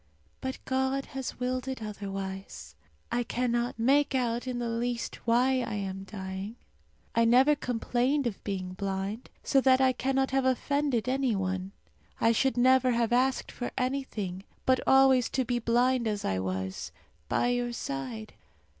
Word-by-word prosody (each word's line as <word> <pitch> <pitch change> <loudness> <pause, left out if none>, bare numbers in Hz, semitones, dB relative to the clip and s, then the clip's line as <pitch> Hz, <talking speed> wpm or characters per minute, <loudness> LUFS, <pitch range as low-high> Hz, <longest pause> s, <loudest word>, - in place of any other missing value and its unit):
But 260 0 -3
God 265 +1 0
has 265 -2 -5
willed 255 +1 -2
it 265 -2 -3
otherwise. 195 -2 -6 0.4
I 240 +1 +1
cannot 240 0 -1
make 275 +4 +3
out 240 -1 0
in 250 -1 -2
the 240 -1 -2
least 235 +1 -2
why 255 +3 +3
I 230 -3 -3
am 195 -1 -4
dying. 190 +1 -6 0.6
I 230 - +3
never 255 +6 +6
complained 250 +2 0
of 225 -5 -3
being 185 -2 -3
blind, 195 +3 -3
so 270 - +3
that 260 0 +5
I 260 -1 +4
cannot 265 +1 0
have 270 0 +2
offended 260 -1 +1
any 260 -3 +1
one. 190 0 -2 0.5
I 225 - +4
should 265 +3 +1
never 255 +1 +5
have 235 0 +1
asked 255 +1 +1
for 245 - -4
anything, 250 -8 -2 0.2
but 260 0 +4
always 265 -2 +5
to 260 -1 0
be 245 0 0
blind 240 +1 +2
as 210 -2 -2
I 95 -1 0
was, 95 -4 -3 0.4
by 240 - +2
your 245 0 0
side. 130 - -5
240 Hz, 155 wpm, -29 LUFS, 200-260 Hz, 0.6 s, never